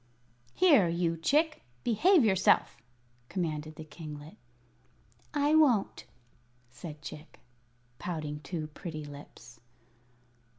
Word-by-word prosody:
"Here, 295 - +6
you 170 0 0
Chick; 305 - +1 0.2
behave 310 - +4
yourself," 190 -3 +3 0.5
commanded 155 -4 -3
the 160 - -8
kinglet. 150 -1 -9 1.0
"I 290 +1 +2
won't," 275 -10 +3 0.7
said 150 +3 -9
Chick, 150 +2 -10 0.6
pouting 155 -4 -4
two 160 0 -5
pretty 155 -4 -6
lips. 140 -4 -12
165 Hz, 90 wpm, -30 LUFS, 150-235 Hz, 1.0 s, Here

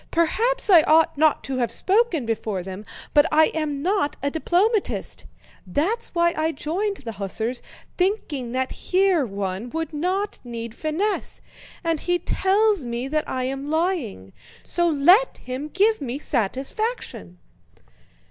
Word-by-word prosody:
Perhaps 455 +10 +1
I 360 -6 +8
ought 320 +1 +4
not 310 +1 +3
to 265 -1 -3
have 240 -3 0
spoken 385 - +2
before 215 -4 -2
them, 190 +3 -7 0.3
but 295 +2 +6
I 310 +1 +5
am 295 -3 -2
not 370 -5 0
a 280 - 0
diplomatist. 375 +7 0 0.4
That's 375 - -1
why 340 0 +3
I 320 +1 0
joined 385 +8 -2
the 240 -4 -7
hussars, 220 +4 -4 0.4
thinking 320 - -1
that 260 0 -1
here 370 -4 +2
one 195 +2 -4
would 325 +3 -4
not 370 +7 -1
need 235 -2 -6
finesse; 320 - -2 0.4
and 330 -2 0
he 355 +3 +1
tells 395 0 +2
me 240 +1 -3
that 305 +1 -1
I 255 -1 -2
am 270 +2 -3
lying—so 325 - -2
let 350 - +4
him 255 +4 -5
give 410 +4 +2
me 260 -1 -3
satisfaction..." 265 - -2
310 Hz, 140 wpm, -23 LUFS, 255-370 Hz, 0.4 s, I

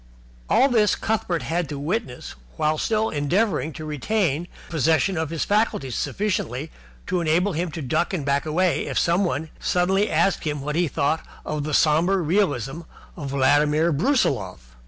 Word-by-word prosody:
All 265 - +5
this 220 -6 +3
Cuthbert 220 -6 -1
had 170 -1 -2
to 145 - -4
witness 150 - -3 0.2
while 155 0 +1
still 220 0 0
endeavouring 155 +3 0
to 155 - -7
retain 160 - -1 0.2
the - - -17
possession 160 +4 +2
of 160 -2 -2
his 165 -1 -2
faculties 205 - 0
sufficiently 155 - -2 0.3
to 180 -1 -1
enable 170 +5 +1
him 170 +3 -2
to 155 0 -6
duck 155 +6 0
and 170 -8 -3
back 140 +2 0
away 175 +3 +1
if - - -3
somebody 170 -3 +1
suddenly 190 +4 +1
asked 195 - +1
him 150 -2 -2
what 150 +2 -3
he 175 +1 +2
thought 150 +3 0 0.2
of 150 -1 -3
the 150 -2 0
sombre 165 +5 +3
realism 160 - 0 0.3
of 145 -5 -6
Vladimir 145 +4 +3
Brusiloff. 115 - 0
160 Hz, 160 wpm, -23 LUFS, 145-185 Hz, 0.3 s, All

